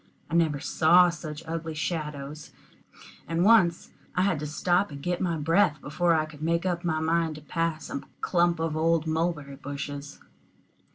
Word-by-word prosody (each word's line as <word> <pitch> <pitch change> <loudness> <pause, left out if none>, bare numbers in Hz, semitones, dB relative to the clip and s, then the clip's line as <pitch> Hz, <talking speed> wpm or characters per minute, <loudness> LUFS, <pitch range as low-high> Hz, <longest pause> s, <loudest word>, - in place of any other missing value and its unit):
I - - -5
never 160 -4 +2
saw 175 +4 +5
such 155 -1 -7
ugly 165 -1 -4
shadows, 150 -2 -4 0.7
and 165 +2 +1
once 190 -7 +4 0.2
I 180 - +3
had 190 -6 +1
to 150 - -4
stop 175 +6 +1
and 140 -1 -8
get 175 +4 -2 0.2
breath 165 -1 +3
before 170 +4 +1
I 155 -1 +1
could 155 -1 -13
make 170 +2 0
up 175 -1 -1
my 160 -2 0
mind 160 0 +1
to 155 - -10
pass 165 +1 -2
a 140 - -4 0.2
clump 175 -2 +2
of 165 -1 -1
old 165 0 +2
mulberry 160 -3 -2
bushes. 140 +1 -6
160 Hz, 165 wpm, -27 LUFS, 150-170 Hz, 0.7 s, saw